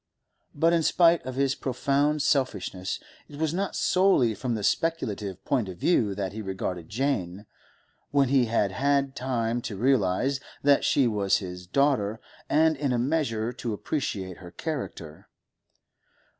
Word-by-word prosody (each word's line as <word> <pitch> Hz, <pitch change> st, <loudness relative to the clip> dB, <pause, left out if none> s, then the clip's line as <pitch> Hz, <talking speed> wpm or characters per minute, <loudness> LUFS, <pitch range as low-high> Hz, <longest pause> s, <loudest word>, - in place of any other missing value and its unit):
But 165 Hz, +3 st, +3 dB
in 170 Hz, -, +3 dB
spite 170 Hz, +1 st, +4 dB
of 130 Hz, -, -4 dB
his 135 Hz, 0 st, +1 dB
profound 140 Hz, +3 st, 0 dB
selfishness, 130 Hz, -10 st, -1 dB, 0.3 s
it 145 Hz, -, -12 dB
was 160 Hz, 0 st, 0 dB
not 195 Hz, +2 st, -2 dB
solely 180 Hz, -, +3 dB
from 120 Hz, +3 st, -3 dB
the 105 Hz, -, -4 dB
speculative 105 Hz, -, -1 dB
point 120 Hz, -8 st, 0 dB
of 90 Hz, -, -8 dB
view 105 Hz, -, +2 dB
that 95 Hz, -2 st, -3 dB
he 110 Hz, -, -5 dB
regarded 95 Hz, -4 st, -4 dB
Jane, 105 Hz, -6 st, -2 dB, 0.6 s
when 140 Hz, -2 st, +2 dB
he 135 Hz, -2 st, +4 dB
had 110 Hz, -3 st, +1 dB
had 140 Hz, +3 st, +1 dB
time 120 Hz, -2 st, -1 dB
to 105 Hz, -4 st, -5 dB
realise 125 Hz, +2 st, +2 dB, 0.2 s
that 140 Hz, 0 st, +4 dB
she 135 Hz, -, +3 dB
was 105 Hz, -4 st, +2 dB
his 90 Hz, -2 st, -7 dB
daughter, 115 Hz, -3 st, +1 dB, 0.3 s
and 160 Hz, +1 st, +4 dB
in 140 Hz, -1 st, -1 dB
a 125 Hz, -, +1 dB
measure 120 Hz, -4 st, 0 dB
to 120 Hz, -2 st, -4 dB
appreciate 100 Hz, -, -3 dB
her 90 Hz, -, -11 dB
character. 85 Hz, -, -6 dB
125 Hz, 150 wpm, -27 LUFS, 100-145 Hz, 0.6 s, spite